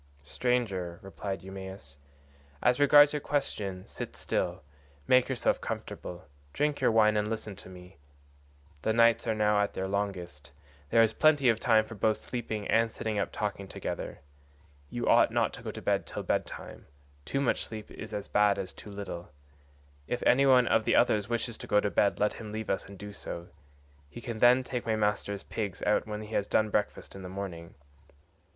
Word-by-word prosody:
"Stranger," 95 - -1
replied 95 -2 -5
Eumaeus, 95 -6 -8 0.7
"as 125 +2 +3
regards 145 +1 +7
your 150 - 0
question: 100 -11 -2
sit - - -7
still, - - -2 0.4
make 130 0 +5
yourself 130 -3 +1
comfortable, 90 -2 -6 0.3
drink 150 0 0
your - - +4
wine, 110 -1 +4
and 105 0 +1
listen 110 -2 -4
to - - -11
me. 90 0 -13 0.8
The 110 - +1
nights 115 +1 +4
are 110 - +1
now 105 -1 +3
at 100 - -1
their 95 - -2
longest; 90 -7 -3 0.4
there 115 - +6
is 110 0 +2
plenty 150 -5 +4
of 115 -1 +2
time 110 -2 +4
both 110 -2 -10 0.2
for - - -13
sleeping 110 -4 -4
and 115 0 +3
sitting 110 -1 -2
up 100 - -1
talking 100 -2 -3
together; - - -5 0.7
you - - -3
ought - - +6
not - - +1
to - - -8
go - - -5
to - - -7
bed - - +1
till - - -5
bed - - 0
time, - - -10 0.4
too 135 - -2
much 140 - 0
sleep 110 -2 -8
is - - -8
as 100 -1 -4
bad 105 -1 +3
as 95 - -5
too - - -11
little; 100 -4 -7 0.8
if 125 - -2
any 135 +2 +5
one 125 -2 +6
of 110 - +3
the - - +2
others 105 0 +3
wishes 120 0 -2
to - - -9
go 105 - +4
to 105 - -1
bed 100 +3 +2
let 105 0 +2
him 110 -2 -8
leave 110 0 -3
us 95 - -1
and 100 0 -11
do 105 +2 -8
so; 85 -3 -7 0.6
he 120 - -9
can 115 -2 -5
then 125 +2 +6
take 125 -2 -4
my 110 - +2
master's 105 -1 -1
pigs 100 -4 -4
out 105 - +2
when 105 0 -4
he 105 +1 -9
has 100 - 0
done 110 -1 +2
breakfast 105 - -1
in 95 - -9
the 90 - -7
morning. 90 -4 -7
105 Hz, 195 wpm, -29 LUFS, 95-115 Hz, 0.8 s, regards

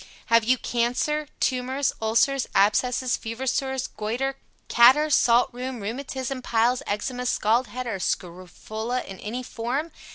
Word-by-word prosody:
HAVE 230 -1 +6
YOU 255 +2 +3
CANCER, 250 +6 -1
Tumors, 260 +2 0
Ulcers, 230 +5 +2
Abscesses, 250 +5 +2
Fever 230 +4 -5
Sores, 265 0 -1
Goitre, 240 +6 -3 0.3
Catarrh, 265 +6 +6
Salt 240 -3 +4
Rheum, 250 0 -5
Rheumatism, 260 +4 -4
Piles, 240 +2 +1
Eczema, 250 +5 -2
Scald 235 +3 +2
Head, 255 +4 -6
or 225 -5 -3
Scrofula 190 +8 -4
in 195 - -10
any 240 +4 -5
form? 255 +8 -3
245 Hz, 130 wpm, -25 LUFS, 225-260 Hz, 0.3 s, HAVE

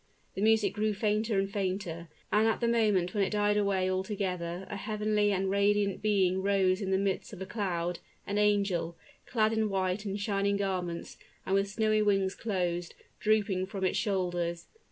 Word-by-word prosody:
The 190 - -4
music 220 -2 +3
grew 215 0 0
fainter 215 +1 0
and 195 0 +1
fainter, 185 -4 -3 0.2
and 215 +1 +4
at 225 - +1
the 235 - +1
moment 210 -6 +2
when 205 - +2
it 190 - 0
died 205 0 +2
away 200 -2 +1
altogether 185 -2 -2
a - - -5
heavenly 210 0 0
and 195 0 0
radiant 200 0 +2
being 190 -3 +2
rose 195 0 +2
in 195 - -2
the 190 - +3
midst 195 +1 -2
of 195 - -8
a - - -6
cloud, 180 -5 -2 0.3
an 205 +1 -1
angel, 200 -5 +1 0.3
clad 220 -2 +2
in 220 -1 +1
white 190 0 -1
and 200 0 -3
shining 200 -1 0
garments, 180 -4 -3 0.3
and 190 - -1
with 195 0 +2
snowy 215 0 +1
wings 195 -2 +2
closed, 175 -5 -2
and - - -29
drooping 205 -3 +1
from 195 0 -5
its 185 - +1
shoulders. 175 -5 -1
200 Hz, 180 wpm, -30 LUFS, 185-210 Hz, 0.3 s, and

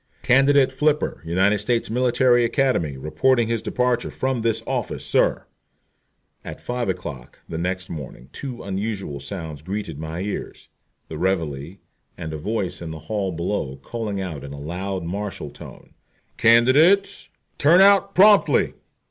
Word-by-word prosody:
"Candidate 135 +1 +4
F, 150 0 +3 0.2
United 95 +5 +2
States 120 -1 -1
Military 125 0 +3
Academy, 115 - 0
reports 80 - +2
his 115 0 -1
departure 125 -1 0
from 130 -2 -2
this 115 -1 0
office, - - -3
sir." - - +1 1.0
At - - -8
five 120 -3 -3
o'clock 80 -9 -6
the 80 - -5
next 95 +1 -2
morning 70 -5 -8
two 130 -4 -7
unusual 100 -6 -4
sounds 80 0 -7
greeted 95 -3 -5
my 80 +2 -5
ears 105 +1 -6 0.4
the 80 - -7
reveille, 85 -4 -2 0.4
and 80 -2 -6
a - - -4
voice 100 +1 -3
in 85 - -6
the 80 - -6
hall 95 +5 -3
below 85 -5 -3
calling 105 - -5
out 85 -7 -5
in 70 0 -8
a 70 - -8
loud 90 +5 -4
martial 100 +4 -5
tone: - - -13 0.4
"Candidates, 140 - +4 0.3
turn 165 +5 +6
out 195 0 +5
promptly!" 205 +2 +5
100 Hz, 140 wpm, -22 LUFS, 80-125 Hz, 1.0 s, turn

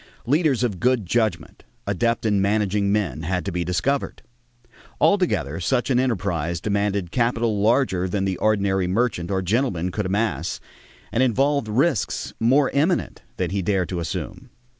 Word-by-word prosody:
Leaders 140 -1 +2
of 105 -7 -1
good 125 -1 +2
judgment, 110 +4 -1 0.2
adept 115 -1 0
in 105 -3 +2
managing 100 0 +1
men, 95 -10 -1
had 90 +3 -2
to 100 - -2
be 90 0 -1
discovered. 90 - -1 0.8
Altogether 110 - +1
such 125 +8 0
an 125 - +3
enterprise 85 - -1
demanded 100 -2 -1
capital 115 -3 0
larger 105 -5 +2
than 95 +1 -1
the 95 -2 -1
ordinary 100 -3 +1
merchant 95 -3 0
or 95 -1 -1
gentleman 90 -4 0
could 105 +1 -2
amass 105 +4 -1 0.5
and 120 - +1
involved 135 +1 +2
risks 130 +3 0
more 135 +5 +3
imminent 160 +6 0 0.2
than - - -1
he 100 0 -1
dared 95 -1 0
to 90 - -3
assume. 85 - -5
105 Hz, 150 wpm, -23 LUFS, 95-125 Hz, 0.8 s, an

